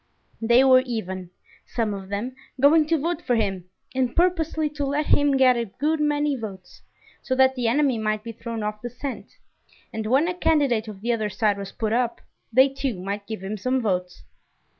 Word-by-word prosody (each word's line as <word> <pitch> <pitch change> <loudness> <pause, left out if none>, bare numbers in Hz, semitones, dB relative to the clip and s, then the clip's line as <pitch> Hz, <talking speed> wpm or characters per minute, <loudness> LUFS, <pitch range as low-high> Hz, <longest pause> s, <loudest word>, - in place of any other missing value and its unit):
They 235 +3 +5
were 260 -1 +7
even, 190 -8 -5 0.4
some 225 -3 -1
of 195 -1 -7
them, 220 +6 -3 0.2
going 300 +3 +5
to 325 0 +2
vote 335 +3 -2
for 245 - 0
him, 195 -5 -1 0.3
and 255 -2 0
purposely 330 -3 +1
to 295 -1 -4
let 285 +2 0
him 285 -2 +3
get 255 -1 +5
a 235 - -1
good 295 +9 -1
many 295 -1 +1
votes, 195 -6 -9 0.4
so 260 - -1
that 265 0 +5
the 250 -3 -1
enemy 265 -1 +2
might 215 -1 -1
be 230 - -6
thrown 230 0 -6
off 210 0 -4
the 240 - -5
scent, 250 +2 -7 0.6
and 220 -1 -3
when 270 +8 +3
a 360 - -1
candidate 285 -10 +1
of 205 -3 -9
the 240 +2 0
other 215 -2 -1
side 205 0 0
was 195 -1 -6
put 220 -1 -2
up, 240 -1 0 0.3
they 260 +4 +6
too 270 -6 -3
might 200 +2 -5
give 220 -4 -6
him 205 +2 -4
some 255 +6 0
votes. 180 -5 -2
240 Hz, 200 wpm, -24 LUFS, 215-280 Hz, 0.6 s, were